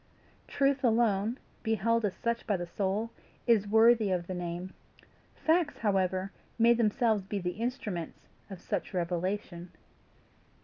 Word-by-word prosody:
Truth 275 0 +1
alone, 225 -1 +2 0.2
beheld 225 0 +1
as 195 - -2
such 235 0 -2
by 205 -4 +1
the 175 - -4
soul, 200 +5 -2 0.3
is 220 -4 +3
worthy 220 0 +5
of 180 -2 0
the 185 - -5
name. 180 +1 -5 0.6
Facts, 320 -1 +1
however, 190 -2 0 0.3
may 235 +1 +6
themselves 225 -2 +2
be 200 +2 -4
the 180 -2 -2
instruments 215 -6 -4 0.2
of 190 -3 -8
such 190 - -4
revelation. 175 0 -2
205 Hz, 130 wpm, -30 LUFS, 185-230 Hz, 0.6 s, may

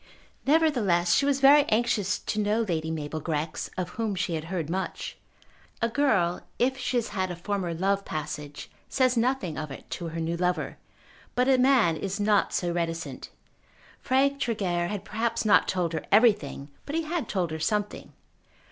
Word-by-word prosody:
Nevertheless 245 - +3
she 280 - +3
was 280 -1 +2
very 285 +2 +8
anxious 215 -5 +1
to 215 - -3
know 210 +2 +1
Lady 160 -6 -2
Mabel 155 -1 -3
Grex, 155 0 -3
of 180 -1 -2
whom 215 +2 -2
she 175 -1 -1
had 155 -1 -3
heard 170 -3 -3
much. 185 +3 -4 0.6
A 230 - +1
girl 220 -10 +1 0.2
if 260 +2 +2
she 255 -1 -1
has 235 - -1
had 190 -2 -2
a 175 - -4
former 185 0 -2
love 195 +3 +1
passage 150 -2 -6 0.2
says 255 -1 +2
nothing 235 - 0
of 155 -1 -5
it 135 - -10
to 170 - -4
her 165 0 -5
new 165 +1 -1
lover; 180 0 -1 0.6
but 250 +1 +2
a 265 -1 +4
man 250 -10 +4
is 195 +4 -3
not 205 0 +2
so 175 -2 -1
reticent. 165 -1 -3 0.7
Frank 275 +2 +2
Tregear 190 -9 0
had 205 0 -5
perhaps 230 +2 -1
not 210 - +5
told 175 -3 -1
her 160 - -2
everything, 205 - +3 0.2
but 290 - -3
he 330 - 0
had 325 0 -3
told 180 -5 -1
her 160 - -4
something. 205 +5 -2
195 Hz, 175 wpm, -27 LUFS, 170-240 Hz, 0.7 s, very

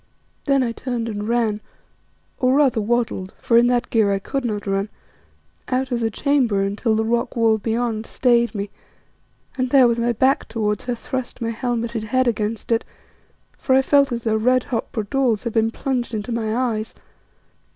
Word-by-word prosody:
Then 275 -2 +3
I 235 - -1
turned 240 -1 -4
and 210 -1 -4
ran, 225 -3 +1 0.8
or 255 0 +3
rather 270 -6 +3
waddled, 225 -4 -1
for 230 - 0
in 235 +1 +6
that 245 -1 0
gear 215 -3 +3
I 195 - +1
could 270 +7 -3
not 210 -4 -3
run, 195 +1 -1 0.8
out 260 0 -1
of 240 - 0
the 225 -1 0
chamber 240 -5 +1
until 210 +3 0
the 220 0 0
rock 235 +1 -1
wall 225 -2 +3
beyond 225 0 -2
stayed 235 -2 +2
me, 200 0 -4 0.9
and 255 0 +1
there, 260 -2 +6
with 235 0 0
my 235 +1 +1
back 260 +5 +2
towards 210 -2 -2
her, 245 -1 -1
thrust 255 +2 -5
my 230 -1 -2
helmeted 235 -1 -2
head 255 +3 +1
against 220 0 -2
it, 230 - +2 0.8
for 260 - +2
I 265 - +4
felt 280 0 +3
as 235 -1 -3
though 220 -1 +1
red 255 +3 +2
hot 230 -3 -3
bradawls 230 +1 0
had 235 -3 -3
been 225 0 +2
plunged 245 -1 -3
into 215 +3 -4
my 225 -1 -1
eyes. 225 -3 -2
235 Hz, 180 wpm, -21 LUFS, 220-250 Hz, 0.9 s, in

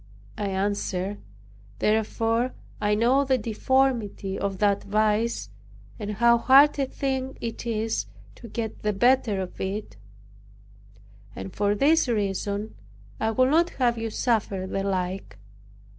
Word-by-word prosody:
I 205 - -3
answered, 195 0 -2 0.6
"Therefore 225 - 0 0.3
I 210 0 +2
know 245 +6 +3
the 265 -1 +2
deformity 230 -3 0
of 195 -1 -2
that 200 0 +2
vice, 215 - 0 0.5
and 210 0 -4
how 235 +2 +4
hard 280 +4 +6
a 270 - +1
thing 265 -1 -3
it 230 +1 -5
is 220 - -1 0.3
to 230 - -12
get 225 -1 -5
the 210 0 0
better 235 -1 +3
of 185 -1 -6
it; 195 - -4 1.4
and 190 - -7
for 205 0 +1
this 295 +7 +3
reason, 205 -1 -1 0.5
I 220 - +1
would 255 +4 +2
not 335 +3 +4
have 240 -3 +1
you 225 0 -2
suffer 210 -5 0
the 195 +1 -2
like." 185 - -3
215 Hz, 130 wpm, -25 LUFS, 200-245 Hz, 1.4 s, hard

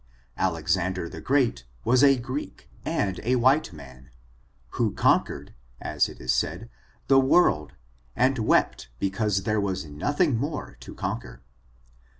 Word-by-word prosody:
Alexander 85 +2 0
the - - -9
Great 130 - +1 0.2
was 125 +3 +4
a 135 -1 +6
Greek, 130 +4 -6 0.2
and 95 -2 -1
a 125 +3 +1
white 130 +4 +3
man, 65 -4 -13 0.6
who - - -1
conquered, - - +1 0.3
as - - 0
it - - -12
is 60 0 0
said, 85 - -2 0.3
the 135 -1 +5
world, 130 - +3 0.4
and 130 0 +2
wept 110 - +1
because 100 - -1
there 105 +1 0
was 95 -3 -2
nothing 130 - 0
more 145 +4 -4
to - - -11
conquer. 60 - -5
105 Hz, 135 wpm, -26 LUFS, 85-130 Hz, 0.6 s, a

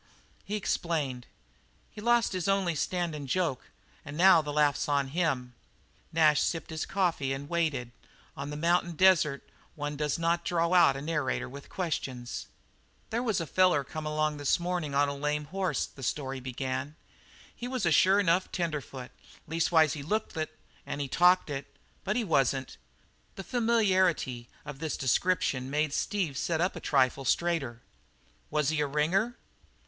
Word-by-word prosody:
He 210 - -4
explained: 150 -10 -2 0.6
"He's 210 - -10
lost 235 -2 +3
his 185 -1 -2
only 195 -3 +2
standin' 160 -2 -2
joke, 155 -2 -1 0.3
and 145 +1 -8
now 180 -1 +7
the 150 -1 -5
laugh's 145 -1 +2
on 140 -2 +1
pa!" 160 -5 +1 0.7
Nash 155 -2 +4
sipped 165 0 -2
his 160 0 -3
coffee 175 -8 0
and 140 +1 -6
waited. 150 -8 -1 0.4
On 140 +1 -5
the 150 - -5
mountain 170 +2 +1
desert 165 -5 +3 0.3
one 145 -1 -4
does 150 0 -1
not 170 +1 +1
draw 170 0 +1
out 170 -6 +6
a 135 - -6
narrator 145 -5 -1
with 140 +2 -11
questions. 135 -9 -4 0.6
"There 230 +2 0
was 220 -6 0
a 165 - -2
feller 180 -2 +3
come 155 +3 -6
along 155 0 +1
early - - -8
this 145 +4 +2
mornin' 175 -5 -2
on 145 +1 +4
a 140 - -2
lame 150 +1 -1
hoss," 185 -2 -1
the 135 - -14
story 135 +1 -2
began. 130 +3 -4 0.6
"He 245 - -6
was 255 -4 -2
a 170 - +3
sure 190 +6 +5
enough 185 -1 +2
tenderfoot 150 -7 -4 0.4
leastways 160 -1 +3
he 150 - -5
looked 210 +9 -2
it 155 -1 -4 0.3
an' - - -5
he 140 - -2
talked 180 +6 +4
it, 135 -1 -4 0.4
but 210 +1 -1
he 245 - +1
wasn't." 135 - 0 0.6
The 195 - -6
familiarity 190 - +1 0.2
of 145 -2 -8
this 160 -1 -3
description 135 -1 +1
made 150 +1 0
Steve 175 -10 -1
sit 165 -2 -1
up 180 +3 +1
a - - -5
trifle 135 -1 +2
straighter. 135 -5 0 0.7
"Was 150 -2 +1
he 155 -1 0
a 145 - +1
ringer?" 180 - +1
155 Hz, 165 wpm, -29 LUFS, 140-180 Hz, 0.7 s, now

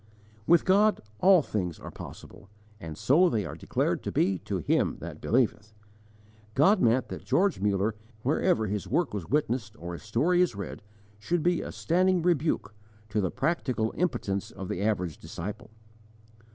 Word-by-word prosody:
With 170 0 +5
God 205 +3 +4 0.2
all 185 -4 +6
things 90 - -3
are - - -9
possible, 100 - -11 0.3
and 80 -2 -7
so 155 - +4
are - - +4
they 110 -4 0
declared 80 - -1
to - - -4
be 95 -1 +1
to - - -3
him - - +1
that - - -8
believeth. 110 -3 0 0.8
God 190 +8 +5
meant 120 +3 +3
that - - -7
George 195 - +2
Muller, 100 +2 +1 0.3
wherever 155 -1 +2
his 105 0 -3
work 170 -8 0
was 100 -6 -5
witnessed 120 -6 0
or 85 +1 -6
his 85 - -7
story 145 +12 +2
is 180 - +1
read, 100 -2 -6 0.4
should 165 +9 -1
be 175 -1 +2
a - - -6
standing 180 +1 +1
rebuke, 160 -10 +1 0.4
to 105 +1 0
the 95 - 0
_practical 130 - -1
impotence 100 - -1
of 95 - -8
the 90 - -3
average 90 -7 -1
disciple. 105 +5 -7
115 Hz, 165 wpm, -28 LUFS, -, 0.8 s, all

